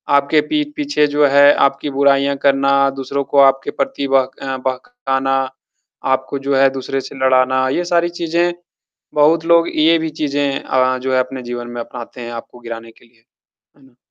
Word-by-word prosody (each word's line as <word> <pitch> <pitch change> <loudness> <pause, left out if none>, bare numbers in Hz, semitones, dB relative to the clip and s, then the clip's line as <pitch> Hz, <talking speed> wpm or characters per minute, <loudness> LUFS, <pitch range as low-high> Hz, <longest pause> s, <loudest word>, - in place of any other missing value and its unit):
आपके 140 +2 +3
पीठ 300 -1 0
पीछे 290 - +1
जो 145 0 +2
है, 140 +1 +6
आपकी 140 +1 0
बुराइयाँ 140 0 +2
करना, 140 0 +3
दूसरों 135 +1 -4
को 140 - -3
आपके 135 0 +3
प्रति 205 - -3
बह 135 -1 +2
बहकाना, 135 - -2 0.7
आपको 130 +1 -1
जो 135 0 -1
है 135 0 +5
दूसरे 135 0 -4
से 140 - -10
लड़ाना, 130 0 +3
ये 175 +6 -1
सारी 175 0 +1
चीज़ें 170 0 -1 0.6
बहुत 160 +2 +3
लोग 170 0 +4
ये 160 +2 +4
भी 160 0 -3
चीज़ें 140 -1 -1
अ, 130 0 +1
जो 130 0 -3
है 130 - +3
अपने 130 0 -3
जीवन 120 0 -6
में 120 0 -6
अपनाते 120 +1 -9
हैं, 120 0 -7
आपको 120 +1 -9
गिराने 115 -1 -8
के 120 - -23
लिए। 115 -1 -29 0.5
हुँ। 130 -2 -23
135 Hz, 175 wpm, -17 LUFS, 130-150 Hz, 0.7 s, है